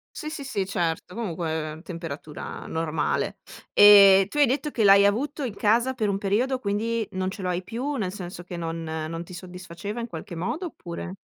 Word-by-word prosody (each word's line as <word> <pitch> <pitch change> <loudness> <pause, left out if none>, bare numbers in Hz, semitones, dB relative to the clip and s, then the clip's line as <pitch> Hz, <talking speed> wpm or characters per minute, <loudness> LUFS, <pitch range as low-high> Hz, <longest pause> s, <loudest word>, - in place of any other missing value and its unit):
Sì, 305 - -5
sì, 310 -2 -6
sì, 210 -8 -2
certo, 175 -2 -2
comunque 160 -7 -3
temperatura 165 -4 -7
normale. 160 -1 -1 0.3
E 200 -2 +8
tu 295 - -3
hai 290 - +7
detto 280 +4 -1
che 235 -6 -1
l'hai 200 0 +7
avuto 280 +9 0
in 225 -5 -5
casa 235 +6 +2
per 220 -5 -1
un 195 - 0
periodo, 225 +7 0
quindi 220 +1 -1
non 185 -1 -2
ce 200 - -8
lo 185 - -2
hai 180 0 -1
più, 245 +9 -3
nel 200 -8 -2
senso 180 -2 -7
che 175 0 -7
non 165 0 -4
non 160 +1 -4
ti 175 - -12
soddisfaceva 180 +4 -7
in 230 - -4
qualche 170 -3 -8
modo, 240 - -3
oppure 180 - -7
195 Hz, 190 wpm, -25 LUFS, 170-230 Hz, 0.3 s, E